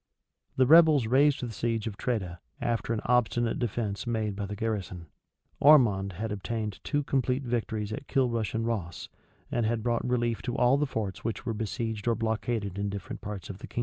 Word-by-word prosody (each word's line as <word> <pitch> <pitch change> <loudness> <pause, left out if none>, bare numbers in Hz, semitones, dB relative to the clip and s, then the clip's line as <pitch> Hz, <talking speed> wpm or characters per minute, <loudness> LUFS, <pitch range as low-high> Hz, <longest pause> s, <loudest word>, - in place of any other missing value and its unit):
The 130 - +4
rebels 155 -3 +7
raised 140 +5 +3
the 120 - -3
siege 115 -1 -1
of 110 -3 -4
Tredah, 95 -7 -2 0.2
after 120 -2 -1
an 115 - -1
obstinate 120 -1 +2
defence 110 -2 -2
made 110 -3 -1
by 100 0 -4
the 105 - -5
garrison.[] 100 -6 -3 0.5
Ormond 110 -10 +5
had 110 +5 -4
obtained 105 0 -3
two 145 -1 0
complete 130 -1 0
victories 110 -3 -2
at 135 - -7
Kilrush 115 -5 0
and 115 0 0
Ross; 100 -7 -3 0.4
and 120 - +1
had 110 0 0
brought 120 -1 0
relief 120 -2 0
to 120 -1 -3
all 125 +3 +4
the 150 0 +1
forts 110 -7 -4
which 115 -1 -3
were 115 - -1
besieged 110 0 -3
or 115 - +3
blockaded 110 -3 -2
in 100 0 -1
different 100 0 -6
parts 100 -2 -6
of 95 -1 -8
the - - -9
kingdom. - - -5
115 Hz, 190 wpm, -28 LUFS, 105-120 Hz, 0.5 s, rebels